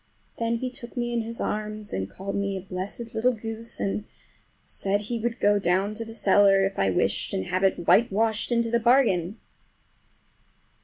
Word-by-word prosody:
Then 230 0 0
he 255 +2 -3
took 240 0 -8
me 240 0 -1
in 235 - +1
his 230 +1 -6
arms 215 0 -3
and 95 0 -2
called 195 - -6
me 200 -1 -1
a - - -5
blessed 195 +5 -6
little 250 +3 +2
goose, 225 0 -5
and 200 +1 -2 0.6
said 200 +1 -1
he 230 +3 -3
would 230 +1 -2
go 205 0 +3
down 190 +3 +1
cellar 205 -3 +3
if 195 - -3
I 95 - +3
wished, 90 - 0
and 95 - -2
have 185 +1 -1
it 190 -3 +1
whitewashed 220 +1 +3
into 235 -1 +1
the 235 - +3
bargain. 225 -6 +3
215 Hz, 170 wpm, -26 LUFS, 195-230 Hz, 0.6 s, go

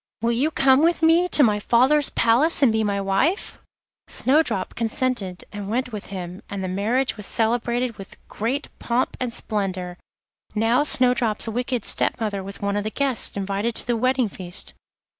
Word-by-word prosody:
Will 235 - +2
you 255 +6 +1
come 270 -2 +4
with 335 +1 +2
me 330 +2 +5
to 300 - +4
my 210 -4 +3
father's 265 +7 +4
palace 270 +8 +3
and 250 - +5
be 220 0 +1
my 200 -1 -1
wife?' 200 - 0 0.5
Snowdrop 265 -9 +1
consented, 230 -5 -2
and 205 -1 -6
went 250 +3 -1
with 210 -2 -7
him, 180 -1 -7
and 200 -1 -4
the - - -2
marriage 225 +8 0
was 210 - -5
celebrated 240 +1 0
with 195 - -10
great 255 +7 -3
pomp 245 +2 -1
and 250 -2 -2
splendour. 190 -6 -3 0.6
Now 230 +6 +2
Snowdrop's 245 -6 +1
wicked 245 0 -2
step - - 0
mother 210 -3 -2
was 195 +1 -6
one 200 0 -1
of 205 - -1
the 215 - -2
guests 265 -3 0
invited 200 +4 -2
to - - +3
the 240 - 0
wedding 255 +1 +1
feast. 185 -1 -7
230 Hz, 175 wpm, -23 LUFS, 200-255 Hz, 0.6 s, me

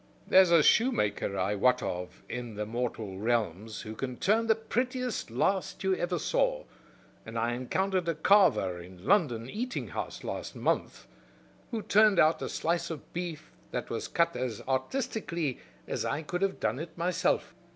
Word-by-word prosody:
There's 190 -1 +7
a 170 -3 +6
shoemaker 105 - +2
I 95 +2 +1
wot 125 +4 +3
of 90 0 -5
in 120 -3 -5
the 105 +1 -2
mortal 110 -4 -3
realms 110 -2 -1
who 110 - -7
can 125 +1 -4
turn 220 +5 +2
the 220 - +5
prettiest 250 - -2
last 185 - 0
you 190 0 +2
ever 175 0 -1
saw; - - +1 0.6
and 110 +1 -7
I 115 +1 +1
encountered 180 +8 0
a 165 - 0
carver 155 - +4
in 90 +1 -11
a - - -16
London 125 - +2
eating 245 - -4
house - - -5
last - - -5
month - - -1 0.6
who 225 -4 -3
turned 210 -1 +5
out 155 0 +4
a - - -3
slice 170 +1 -1
of 160 -4 -8
beef 170 -3 -5 0.2
that - - -4
was - - -3
cut 170 -5 +1
as 125 -3 -3
artistically 160 - -1 0.3
as - - -2
I 155 - -2
could 175 +5 -3
have 195 -1 0
done 110 +4 0
it 165 +2 -7
myself. 175 +1 0
155 Hz, 170 wpm, -30 LUFS, -, 0.6 s, There's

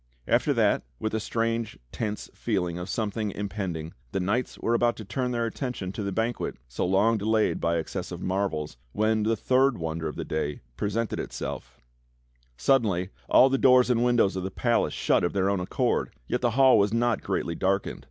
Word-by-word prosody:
After - - +3
that, - - +3 0.2
with 110 - -2
a 110 - +1
strange, 115 +1 -2
tense 105 -2 -4
feeling 90 -6 -2
of 90 +2 -6
something 110 0 -2
impend 100 -3 -3
ing, 80 +1 -7 0.2
the - - 0
knights 105 +7 -1
were 115 - 0
about 120 0 +2
to 110 - -9
turn 125 +5 -2
their 120 -1 0
attention 115 -5 -4
to 105 - -5
the 100 -1 -2
banquet 115 +4 -2
so - - -2
long 105 +4 +3
delayed 110 +1 +1
by 85 0 +1
excess 90 +3 -4
of 90 - -5
marvels, 95 -8 -2 0.2
when 110 +1 +2
the 110 +2 +2
third 130 +3 +2
wonder 80 0 -3
of 75 - -5
the - - -4
day 75 -2 -3
presented 105 - -2
itself: - - -6 0.8
Suddenly 95 - +2 0.2
all 130 - +7
the 135 0 +1
doors 125 -1 +5
and 120 -1 +2
windows 120 -6 +3
of 95 - -2
the 95 - -3
palace 120 +4 0
shut - - +2
of 85 - 0
their 100 0 +2
own 100 - 0
accord, 90 - 0 0.2
yet 125 - -1
the 120 - +3
hall 135 -1 +7
was 100 0 +3
not 115 -1 +1
greatly 85 - -2
darkened. 95 +3 -1
105 Hz, 195 wpm, -27 LUFS, 95-115 Hz, 0.8 s, all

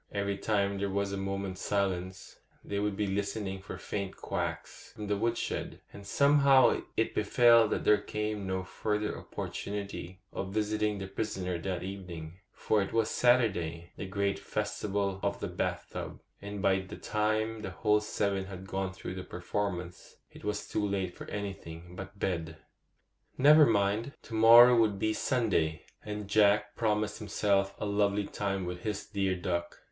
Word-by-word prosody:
Every 100 0 -1
time 100 -2 0
there 100 0 -1
was 100 0 -1
a - - -2
moment's 95 -1 -3
silence, 95 -2 -2 0.3
they 100 - -2
would 105 -1 -1
be 105 - +1
listening 100 0 -2
for 95 - -7
faint 100 -2 -4
quacks - - -5
from 105 - -7
the 105 0 0
wood 115 +3 0
shed, - - -3
and 100 -1 -10
somehow 140 0 +5 0.2
it 110 - +1
befell 115 +2 +5
that - - -1
there 105 -1 +5
came 105 -2 -3
no 95 0 -1
further 105 +3 -2
opportunity 100 -3 -6
of 95 0 -4
visiting 105 -1 0
the 95 - -4
prisoner 95 -3 -3
that 90 0 -3
evening; 90 -3 -7
for 110 - +1
it 100 - -3
was 115 -1 +2
Saturday,—the 95 -9 +1
great 100 +1 -1
festival 105 -2 -2
of - - -1
the - - -3
bath - - -3
tub,—and 100 0 -7
by 95 -1 +4
the 95 0 -8
time 110 +1 -1
the 105 - -4
whole 105 +3 +2
seven 100 -2 -1
had 95 -1 -8
gone 95 0 -3
through 95 - -6
the 95 0 -6
performance, 90 -1 -4 0.2
it - - -14
was 105 0 -3
too 105 - -1
late 95 -3 -1
for - - -9
anything 90 -4 -6
but 95 +1 -8
bed. 80 -5 -2 0.8
Never 150 +3 +8
mind; 105 +4 +1
to - - -11
morrow 115 +2 +9
would 105 -3 +3
be 110 +2 +1
Sunday, 100 - 0 0.2
and 105 -1 -5
Jack 105 0 +3
promised 105 -1 0
himself 100 -2 +1
a - - -3
lovely 100 0 +1
time 100 -2 -2
with 90 0 -5
his 105 0 -3
dear 95 -3 -1
cluck. 85 -1 -3
100 Hz, 160 wpm, -30 LUFS, 95-105 Hz, 0.8 s, morrow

